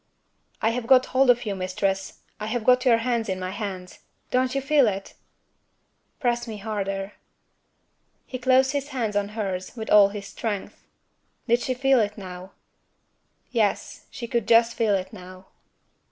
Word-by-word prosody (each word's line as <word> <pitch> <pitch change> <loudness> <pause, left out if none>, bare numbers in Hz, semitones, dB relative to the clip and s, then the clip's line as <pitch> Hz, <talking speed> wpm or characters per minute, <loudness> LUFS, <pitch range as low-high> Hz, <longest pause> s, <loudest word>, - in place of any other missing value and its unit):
"I 225 - +3
have 235 0 -4
got 260 0 +6
hold 260 0 +4
of 240 -1 +4
you, 205 - -2
Mistress! 190 +1 -2 0.2
I 215 - -4
have 230 0 -2
got 250 +2 +4
your 235 -3 +5
hands 235 -4 0
in 185 0 -2
my 185 0 -4
hands. 190 -3 -6 0.3
Don't 255 +1 +1
you - - +2
feel 275 -1 +3
it?" 195 -1 -3 1.1
"Press 240 -2 0
me 220 -2 -6
harder." 195 -1 -4 1.1
He 255 - -6
closed 260 +1 +4
his 285 -1 -2
hands 235 -7 -3
on 205 0 0
hers 190 0 -4
with 220 - -5
all 205 -1 +7
his 200 -1 -7
strength. 205 -1 -5 0.6
Did 235 +1 +3
she 255 +1 -2
feel 270 0 +3
it 210 -1 -1
now? 185 -1 -9 1.0
Yes; 220 -5 -1
she 235 - -7
could 235 -2 -1
just 230 0 +5
feel 220 -4 +2
it 185 -1 -4
now. 185 +1 -11
220 Hz, 165 wpm, -25 LUFS, 195-250 Hz, 1.1 s, all